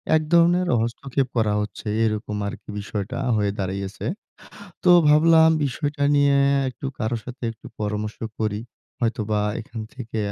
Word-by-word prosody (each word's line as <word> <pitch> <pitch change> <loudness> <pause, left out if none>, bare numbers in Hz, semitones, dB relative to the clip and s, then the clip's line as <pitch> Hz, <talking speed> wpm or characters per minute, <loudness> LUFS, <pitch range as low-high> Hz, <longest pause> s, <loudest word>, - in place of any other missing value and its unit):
এক 155 - +3
ধরনের 175 +2 +5
হস্তক্ষেপ 130 +3 -1
করা 105 -2 +2
হচ্ছে, 105 +1 -6 0.2
এরকম 105 -1 -1
আরকি 100 - -8
বিষয়টা 105 +3 -4 0.2
হয়ে 105 -1 +1
দাঁড়িয়েছে। 95 +1 -4 0.8
তো 180 - +6 0.2
ভাবলাম 160 +2 +6
বিষয়টা 145 +2 -2
নিয়ে 140 -1 +4 0.3
একটু 130 +2 -6
কারো 115 0 -1
সাথে 125 +1 -10
একটু 115 - -15
পরামর্শ 105 +1 -3 0.2
করি। 105 -1 -1 0.4
হয়তোবা 110 -3 0 0.2
এখান 115 +1 -8
থেকে 115 -3 -6
115 Hz, 135 wpm, -23 LUFS, 105-140 Hz, 0.8 s, তো